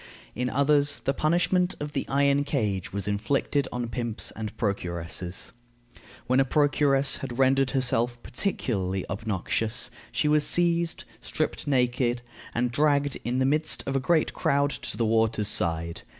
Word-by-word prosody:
In 125 +2 -2
others, 145 +1 +2
the 135 - +1
punishment 175 +4 +1
of 150 0 -4
the 140 - -3
iron 140 +1 +3
cage 105 - -2
was 100 0 -3
inflicted 130 +6 0
on 120 -1 -3
pimps 115 -1 -2
and 110 -1 -5
procuresses. 90 -3 -3 0.7
When 130 +2 +2
a - - +6
procuress 140 -1 +2
had 120 - -6
rendered 135 0 +3
herself 125 -3 +1
particularly 100 - -2
obnoxious, 110 +3 -2 0.2
she 150 - 0
was 150 0 +3
seized, 170 -1 +2 0.2
stripped - - -3
naked, 125 -2 +1 0.3
and 120 +1 0
dragged 145 0 +2
in 120 +2 -1
the 130 - +2
midst 150 +3 +3
of 135 - -2
a - - +3
great 160 +4 +1
crowd 140 +1 +1
to - - -6
the 115 - +1
water's 110 -1 +2
side. 85 0 -1
130 Hz, 150 wpm, -26 LUFS, 110-145 Hz, 0.7 s, a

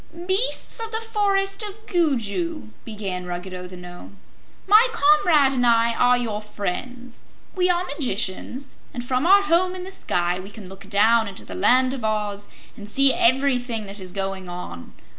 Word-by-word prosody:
"Beasts 390 +6 0
of 450 -1 -5
the 445 - -1
Forest 405 -3 0
of 425 +1 -8
Gugu," 315 - -1 0.2
began 195 -5 -5
Ruggedo 180 +1 -6
the 180 0 -11
Nome, 180 +2 -12 0.5
"my 430 +5 +6
comrade 375 -10 +4
and 250 -2 0
I 230 -1 +3
are 245 +1 +3
your 220 -4 -3
friends. 230 +5 -6 0.3
We 365 -1 +2
are 355 0 +2
magicians, 260 - -3 0.3
and 245 0 -5
from 255 +5 0
our 400 +2 +6
home 365 0 +2
in 365 - -6
the 380 - -7
sky 175 - -1
we 190 +2 -9
can 205 -2 -11
look 195 +1 -12
down 220 +2 +3
into 195 - -6
the 95 - -8
Land 255 - +3
of 260 -4 -6
Oz 210 -2 -2 0.3
and 210 -3 -10
see 275 +3 +4
everything 245 -3 +1
that 200 +1 -8
is 185 -1 -8
going 195 -1 -4
on. 175 - -8
245 Hz, 170 wpm, -23 LUFS, -, 0.5 s, my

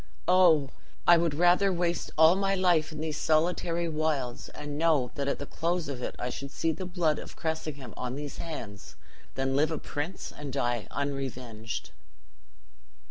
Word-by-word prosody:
Oh! 170 -7 +5 0.3
I 175 - +8
would 165 -3 +1
rather 180 +4 +4
waste 175 -1 -1
all 160 +2 +8
my 195 0 +1
life 175 -4 +3
in 155 -1 -6
these 155 -1 -3
solitary 170 +1 +1
wilds 150 -6 -1
and 145 -1 -6
know 150 -6 +2
that 140 -1 -3
at 140 - 0
the 145 - -5
close 170 +3 -1
of 135 -3 -5
it - - -4
I 125 - -3
should 140 +2 -6
see 165 +3 0
the 185 +3 -5
blood 175 -4 +1
of - - -9
Cressingham 155 -6 -4
on 125 0 -4
these 145 -1 -6
hands 105 -12 -7 0.4
than 135 0 0
live 150 +2 +3
a 160 - -2
prince 150 +7 -5
and 145 -2 -6
die 120 -4 -1
unrevenged!" 130 -6 -4
155 Hz, 170 wpm, -29 LUFS, 135-170 Hz, 0.4 s, I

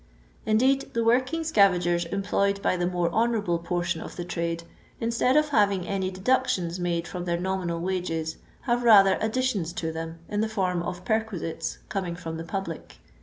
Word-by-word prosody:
Indeed, 260 +6 +2
the 230 - +2
working 255 +8 +2
scavagers 180 - +3
employed 200 0 +1
by - - +2
tlie 175 0 -1
more 175 -1 0
honourable 215 -5 +1
portion 175 -1 -2
of - - -8
the 175 - -5
trade, 170 -1 -2 0.4
instead 235 +4 +2
of 300 0 +3
having 200 -8 +2
any 190 -1 -1
deductions 185 -4 0
made 170 -1 -1
from 180 -1 -5
their 170 -1 0
nominal 180 -2 -2
wages, 165 -3 -2 0.2
have 240 -1 0
rather 200 -5 +6
additions 220 -6 0
to 160 -2 -3
them 165 0 -6
in 205 0 -1
the 220 - 0
form 185 -5 0
of 180 +1 -5
perquisites 220 -7 -2
coming 185 -4 -3
from 165 -2 -6
the 165 - -5
public. 195 +4 -5
185 Hz, 170 wpm, -26 LUFS, 170-220 Hz, 0.4 s, rather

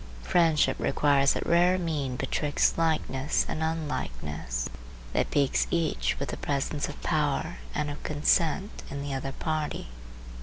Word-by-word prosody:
Friendship 165 - +3
requires 140 -1 +3
that - - -3
rare 175 +2 +4
mean 150 -7 -2
betwixt 145 +2 +1
likeness 155 -4 +1
and 155 - -3
unlikeness 75 - -3 0.5
that - - +1
piques 140 -2 +2
each 110 - 0
with - - -3
the - - -4
presence 145 +1 -1
of 145 - -8
power 145 - 0 0.2
and 150 - -1
of 145 - -8
consent 165 +6 +1
in 140 0 -4
the 140 -1 -3
other 135 0 -3
party. 155 - -3
145 Hz, 140 wpm, -28 LUFS, 135-160 Hz, 0.5 s, rare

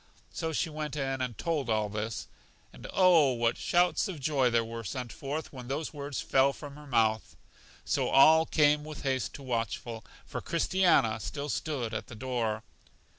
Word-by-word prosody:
So 160 -1 -2
she 160 - 0
went 150 -1 -4
in 135 -2 -2
and 125 -3 -3
told 155 -7 -1
all 110 -1 +1
this. 105 +1 -4 0.5
And, - - -10
oh, 170 -8 +5
what 115 -1 +1
shouts 175 +4 +2
of 180 -6 -6
joy 135 -2 +2
were 115 0 -6
sent 125 +2 -5
forth 145 +3 -5
when 125 -2 -8
those 145 +5 -3
words 145 -2 -5
fell 135 +1 +3
from 145 -1 -9
her 150 0 -12
mouth! 110 -4 +1 0.5
So - - 0
all 160 +4 +6
came 150 -1 +3
with 155 -1 -8
haste 130 -3 -1
to 140 - -9
Watchful; 115 -2 -3 0.2
for - - -5
Christiana 170 -10 +2
still 145 +7 -5
stood 130 -9 -2
at 110 - -4
the 115 - -10
door. 115 -3 -2
135 Hz, 175 wpm, -30 LUFS, 115-150 Hz, 0.5 s, all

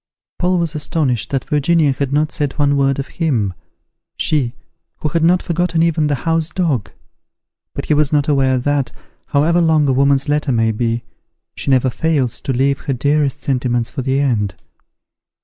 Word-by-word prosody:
Paul 180 0 +2
was 170 -2 -1
astonished 150 - -1
that 135 -2 -2
Virginia 150 0 +2
had 135 0 -2
not 150 +2 +1
said 145 -5 -2
one 145 -2 +1
word 135 -1 +2
of 140 - -4
him, 120 - -1 0.6
she, 135 -5 0 0.4
who 155 - -2
had 165 +3 0
not 175 +2 +3
forgotten 170 -1 0
even 160 -2 +1
the 145 - +1
house 165 0 +1
dog. 155 - -1 0.9
But - - -4
he - - +1
was 150 -1 +2
not 145 -2 +2
aware 135 -3 +2
that, 140 +1 0 0.4
however 165 +5 +2
long 160 -3 +3
a 135 - +2
woman's 140 +1 +2
letter 150 -1 0
may 115 -2 +2
be, 115 +1 -1 0.5
she - - -5
never 130 -1 +3
fails 140 -5 0
to - - -2
leave 135 +2 +1
her 135 - -3
dearest 140 +1 0
sentiments 125 -3 -1
for - - -4
the 135 +1 0
end. 110 -9 0
140 Hz, 175 wpm, -18 LUFS, 130-155 Hz, 0.9 s, not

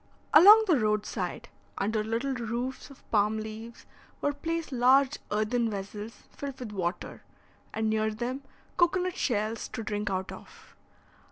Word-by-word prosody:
Along 415 +8 +9
the 335 -9 +3
road 210 -1 +1
side, - - -4 0.3
under 215 +1 0
little 230 +5 -1
roofs 240 +3 -4
of 275 - -17
palm 210 0 +2
leaves, 220 +2 -8 0.3
were 290 - 0
placed 330 +2 -3
large 260 +2 +4
earthen 220 +3 0
vessels 205 +2 -7
filled 280 -2 -6
with 240 -4 -6
water, 185 -3 -4 0.5
and 220 0 -1
near 215 0 +1
them 240 +5 -4 0.4
cocoa 350 +1 +3
nut 365 0 -3
shells 220 - -1
to 225 - -6
drink 210 0 -2
out 190 0 -2
of. - - -13
230 Hz, 150 wpm, -28 LUFS, 215-275 Hz, 0.5 s, Along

